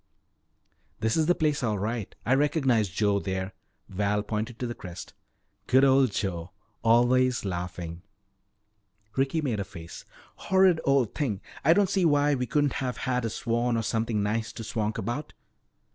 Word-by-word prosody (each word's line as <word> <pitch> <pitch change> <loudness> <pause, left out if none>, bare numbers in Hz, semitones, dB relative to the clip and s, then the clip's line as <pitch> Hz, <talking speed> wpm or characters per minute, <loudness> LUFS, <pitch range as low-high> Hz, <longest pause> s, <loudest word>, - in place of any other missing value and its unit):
"This 110 0 +1
is 160 -1 +2
the 175 - +4
place 150 -3 0
all 110 -4 0
right 105 +1 -3
I 125 - +3
recognize 135 - +2
Joe 100 +1 +1
there." 95 0 -3 0.3
Val 105 +1 0
pointed 110 +2 -3
to 125 - -3
the 120 - -3
crest. 90 -6 -9 0.5
"Good 130 +1 +5
old 135 -3 +5
Joe, 90 -4 -3 0.3
always 120 +1 +3
laughing." 90 -2 -5 1.1
Ricky 135 +4 +1
made 125 -8 -1
a - - -1
face. 85 -3 -10 0.5
"Horrid 190 -3 +5
old 135 -5 +2
thing. 115 -10 -1 0.2
I 160 - +6
don't 200 +1 +3
see 190 0 +1
why 145 -2 +3
we 125 -2 -1
couldn't 145 +2 +1
have 125 -2 -2
had 125 -2 0
a - - 0
swan 120 +2 0
or 115 - -1
something 110 -2 0
nice 110 +2 -1
to 115 - -7
swank 110 -1 -2
about." 135 +6 -4
120 Hz, 160 wpm, -27 LUFS, 105-135 Hz, 1.1 s, I